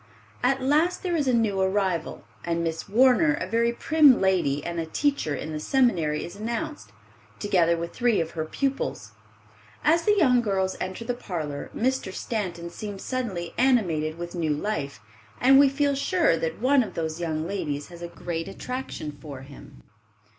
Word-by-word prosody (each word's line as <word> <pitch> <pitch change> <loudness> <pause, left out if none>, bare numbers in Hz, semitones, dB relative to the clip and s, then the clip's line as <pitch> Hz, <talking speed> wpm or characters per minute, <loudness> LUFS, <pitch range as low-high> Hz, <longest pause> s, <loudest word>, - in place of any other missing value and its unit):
At 265 +1 +1
last 310 +7 +2
there 355 -2 0
is 295 -4 0
a - - +4
new 220 -5 +1
arrival, 190 -4 0 0.2
and 170 0 -1
Miss 165 +4 -3
Warner, 260 +8 +4
a - - -3
very 230 +4 +1
prim 295 +1 +5
lady 170 -7 +1
and 170 -1 -3
a 165 - -3
teacher 275 - 0
in 155 - -5
the 155 - -3
seminary, 170 - +1
is 175 - -9
announced, 235 +9 -4 0.5
together 175 -5 +2
with 170 0 -5
three 240 -3 +2
of 165 0 -2
her 160 - -3
pupils. 275 - -3 0.7
As 330 +2 +4
the 415 +4 +2
young 255 -9 +4
girls 190 -4 0
enter 185 +5 -4
the 245 - -1
parlor, 160 -11 -5
Mr. 260 -4 0
Stanton 180 -5 -4
seems 205 0 -7
suddenly 205 -10 -3
animated 175 -12 +2
with 175 0 -6
new 160 -4 0
life, 145 - -3 0.4
and 270 +2 +6
we 280 -1 +7
feel 285 +1 +1
sure 320 - +2
that 165 0 -3
one 265 +3 +4
of 225 - -5
those 160 0 -3
young 160 -2 -2
ladies 150 -7 -3
has 170 -1 -12
a 170 - -4
great 170 0 -5
attraction 250 -7 -5
for 140 -3 -8
him. 135 - -14
195 Hz, 175 wpm, -26 LUFS, 165-255 Hz, 0.7 s, we